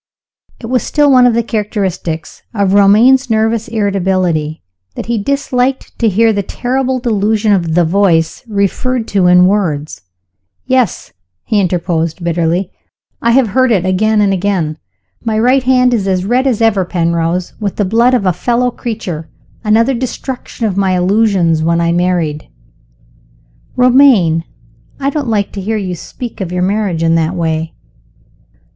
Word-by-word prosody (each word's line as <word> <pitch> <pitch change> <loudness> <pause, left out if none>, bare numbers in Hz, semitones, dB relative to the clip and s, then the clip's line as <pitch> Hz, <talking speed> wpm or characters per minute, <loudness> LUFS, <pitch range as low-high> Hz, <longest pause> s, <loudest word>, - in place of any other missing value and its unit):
It - - -9
was 250 +1 0
still 295 -1 +2
one 250 -1 +6
of 235 - +1
the 235 - +1
characteristics 200 -7 -4
of 200 -2 +1
Romayne's 230 +7 +4
nervous 225 +1 0
irritability 185 -7 -1 0.3
that - - -5
he 235 -1 -1
disliked 270 +1 -1
to 230 - +2
hear 220 +3 +2
the 200 - -1
terrible 255 +5 -2
delusion 215 -3 +1
of 170 -4 0
the 175 -1 +3
Voice 165 -1 +1
referred 225 +4 -1
to 195 -3 +2
in 180 0 +6
words. 170 -7 -1 0.6
"Yes," 255 -2 -1 0.3
he 215 - 0
interposed 175 -2 -1
bitterly, 170 +2 -1 0.5
"I 235 - +1
have 255 -3 +3
heard 255 +4 +2
it 190 -5 +1
again 210 +3 +1
and 200 -1 +2
again. 180 -5 -1 0.4
My 220 -2 -1
right 250 +4 +3
hand 250 -1 +2
is 205 -5 -1
as 185 -1 0
red 250 +5 +1
as 235 -4 0
ever, 205 -4 +2
Penrose, 170 0 -1
with 205 -3 -3
the 205 - 0
blood 235 +6 +3
of 220 -6 -1
a 185 - +2
fellow 245 +7 0
creature. 185 -11 -6 0.3
Another 230 +4 +2
destruction 255 -1 -5
of 200 -3 -2
my 190 -2 +1
illusions 185 -4 +2
when 170 +1 +1
I 170 0 +1
married!" 170 -4 -1 1.3
"Romayne! 250 - +4 0.5
I 275 0 -1
don't 285 -4 -3
like 205 -3 -1
to 200 - -6
hear 215 +3 -2
you 190 -3 -3
speak 235 +6 -8
of 180 -2 -4
your 180 0 -1
marriage 195 -4 -1
in 165 0 +2
that 165 +2 0
way." 160 -1 -2
200 Hz, 155 wpm, -14 LUFS, 180-235 Hz, 1.3 s, one